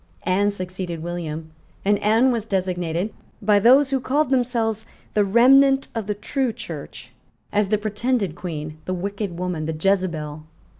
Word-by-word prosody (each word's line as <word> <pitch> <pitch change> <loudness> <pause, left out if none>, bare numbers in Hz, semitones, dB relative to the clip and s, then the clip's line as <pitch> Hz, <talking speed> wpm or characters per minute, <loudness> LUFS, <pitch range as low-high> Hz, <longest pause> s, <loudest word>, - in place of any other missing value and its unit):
Anne 200 +3 +2
succeeded 185 -4 -5
William; 160 -2 -5 0.3
and 205 0 +3
Anne 225 +5 +4
was 225 -3 -2
designated, 180 -1 -1 0.3
by 205 0 +4
those 265 +6 +5
who 270 - +2
called 275 +2 0
themselves 230 -4 0 0.3
the 210 - +3
remnant 270 +6 +5
of 225 -3 -4
the 210 - -1
true 260 +4 -1
Church, 225 - -9 0.4
as 205 -1 +2
the 215 - +3
pretended 215 -2 -1
Queen, 155 -3 -6
the 185 - -2
wicked 195 0 -4
woman, 175 -4 -3
the 160 -1 -3
Jezebel. 165 -5 0
200 Hz, 150 wpm, -23 LUFS, 175-230 Hz, 0.4 s, those